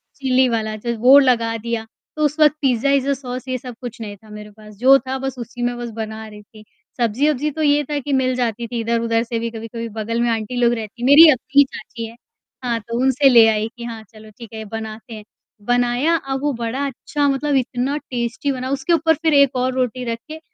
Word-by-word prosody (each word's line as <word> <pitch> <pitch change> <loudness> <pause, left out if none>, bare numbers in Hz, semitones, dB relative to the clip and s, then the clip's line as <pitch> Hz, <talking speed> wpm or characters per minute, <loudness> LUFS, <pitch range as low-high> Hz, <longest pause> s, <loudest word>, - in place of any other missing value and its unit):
Chilli 260 -1 +2
वाला 220 -2 -2
जो 235 +2 -3
वो 260 +4 +7
लगा 235 -4 +2
दिया। 230 0 -4 0.3
तो 305 - -1
उस 300 +2 -2
वक़्त, 300 -1 +6
पिज़्ज़ा 265 -1 +1
इज्जा 280 0 +2
अ, - - +3
सॉस 255 -1 -7
ये 255 0 -2
सब 250 0 -9
कुछ 240 -2 -7
नहीं 205 -2 -6
था 215 +2 -20
मेरे 210 0 -10
पास। 210 0 -15
जो 265 +4 +6
था, 265 0 -4
बस 270 -1 -4
उसी 240 +1 -8
में 240 0 -1
बस 240 0 -5
बना 220 0 -6
रही 210 -1 -12
थी। 215 0 -17 0.3
सब्ज़ी-अब्ज़ी 275 +6 0
तो 315 +2 -5
ये 290 0 +3
था 295 - -1
कि 280 +1 -4
मिल 255 -1 +1
जाती 235 -1 -2
थी 235 0 -4
इधर-उधर 230 0 0
से 230 -1 -3
भी। 230 0 -3
कभी-कभी 230 +1 -6
बगल 230 +2 -2
में 240 - +1
आंटी 225 +2 -3
लोग 235 0 +4
रहतीं 235 +1 -5
मेरी 305 +4 +9
अपनी 280 +1 +3
चाची 230 -3 -8
है 225 - -13 0.5
हाँ, 235 -2 -1
तो 230 +2 -5
उनसे 265 +1 +4
ले 235 -3 +7
आई 215 0 +1
कि, 235 - -8
"हाँ, 230 -2 -7
चलो 215 0 -14
ठीक 230 -3 -12
है, 220 0 -6
बनाते 220 +2 -7
हैं।" 215 - -9 0.4
बनाया। 245 +6 +2
अब 270 -3 -3
वो 290 -1 0
बड़ा 235 +3 -3
अच्छा 285 +2 -2
मतलब, 280 +1 0
इतना 260 +2 -1
टेस्टी 250 +2 -3
बना। 255 -1 -4
उसके 275 +5 0
ऊपर 325 -1 +3
फिर 320 -2 +3
एक 280 -2 +4
और 255 +1 0
रोटी 255 -1 -2
रख 230 - -4
के 315 +1 -8
245 Hz, 230 wpm, -20 LUFS, 225-270 Hz, 0.5 s, मेरी